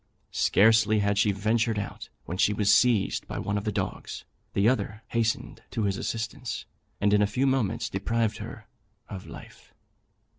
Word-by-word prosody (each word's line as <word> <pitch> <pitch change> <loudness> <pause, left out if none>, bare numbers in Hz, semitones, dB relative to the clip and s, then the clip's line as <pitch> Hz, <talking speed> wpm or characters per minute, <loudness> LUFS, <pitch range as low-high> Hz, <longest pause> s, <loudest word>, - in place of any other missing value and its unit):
Scarcely 110 +1 +4
had 100 0 +1
she 105 -1 +4
ventured 110 +3 +1
out, 100 - -5 0.2
when 90 - -4
she 100 +3 +3
was 105 -1 +4
seized 120 -6 +3
by - - -5
one 100 - -2
of 105 - -2
the 105 - 0
dogs; 95 -2 -4 0.3
the 100 +2 +3
other 110 -3 0
hastened 115 -1 -1
to 110 - -2
his 100 -1 +1
assistance, 115 +2 -4 0.3
and 105 0 +3
in 105 - +5
a 105 - +4
few 125 +7 0
moments 130 -7 +1
deprived 115 +3 -1
her - - -8 0.4
of 95 -2 -7
life. - - -13
105 Hz, 170 wpm, -27 LUFS, 100-115 Hz, 0.4 s, in